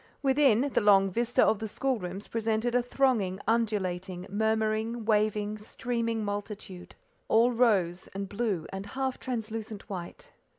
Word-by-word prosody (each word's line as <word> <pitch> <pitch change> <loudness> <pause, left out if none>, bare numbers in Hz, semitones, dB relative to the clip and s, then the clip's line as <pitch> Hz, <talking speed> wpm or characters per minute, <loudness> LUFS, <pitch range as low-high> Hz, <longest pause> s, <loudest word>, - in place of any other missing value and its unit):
Within, 265 -4 +4
the - - +3
long 195 -2 +5
vista 240 +4 +2
of 215 - +2
the 220 - -3
school 260 +3 -1
rooms 185 +2 -6
presented 225 +1 -1
a 245 - +4
thronging, 240 -7 +1
undulating, 190 -5 -1
murmuring, 220 +2 0
waving, 215 -1 +1
streaming 230 0 -2
multitude, 205 -3 -6 0.3
all 230 +3 +4
rose, 195 -7 +2
and 195 0 -3
blue, 200 -5 -2
and 195 0 -4
half 265 +3 -2
translucent 225 -4 -5
white. 175 -3 -7
215 Hz, 135 wpm, -29 LUFS, 195-235 Hz, 0.3 s, long